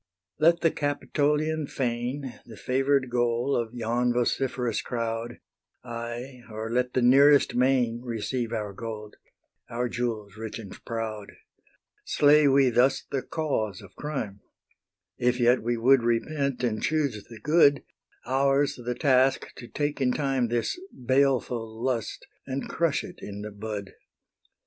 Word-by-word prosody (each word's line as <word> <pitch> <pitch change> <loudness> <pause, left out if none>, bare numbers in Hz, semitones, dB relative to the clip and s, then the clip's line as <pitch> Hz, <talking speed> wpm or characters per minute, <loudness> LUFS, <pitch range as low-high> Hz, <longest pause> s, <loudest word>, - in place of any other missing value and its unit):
Let 170 +2 +4
the 165 - +3
Capitolian 150 +1 0
fane, 125 +1 -3
The 110 -3 -11
favour'd 135 0 +1
goal 120 +2 +1
of 120 0 -2
yon 120 +1 0
vociferous 125 -1 0
crowd, 115 -1 -3 0.5
Aye, 120 +2 -6
or 110 +1 -5
let 125 +1 0
the 130 - +2
nearest 140 +3 +6
main 125 -2 +2
Receive 120 0 -3
our 105 -3 -3
gold, 105 0 -7 0.5
our 120 +1 -1
jewels 115 -4 -3
rich 110 -1 -6
and 110 -4 -9
proud: 110 -3 -4 0.7
Slay 150 0 +5
we 135 -2 +4
thus 130 +3 +3
the 135 - 0
cause 120 - -2
of 95 -3 -14
crime, 125 -10 -4 0.8
If 125 +1 +1
yet 120 +1 +4
we 120 +1 -1
would 130 +3 +5
repent 130 +3 -1
and 110 -3 0
choose 145 -10 0
the 115 -2 -10
good: 145 +1 +4 0.4
Ours 135 +2 +2
the 120 +1 -2
task 135 -2 +2
to 120 - -9
take 145 +4 -2
in 125 -1 +2
time 135 -4 0
This 120 - -1
baleful 125 -4 0
lust, 120 -3 -2 0.2
and 135 +1 -3
crush 165 -3 0
it - - -10
in 100 0 -7
the 105 - -6
bud. 105 -1 -6
125 Hz, 140 wpm, -27 LUFS, 115-135 Hz, 0.8 s, nearest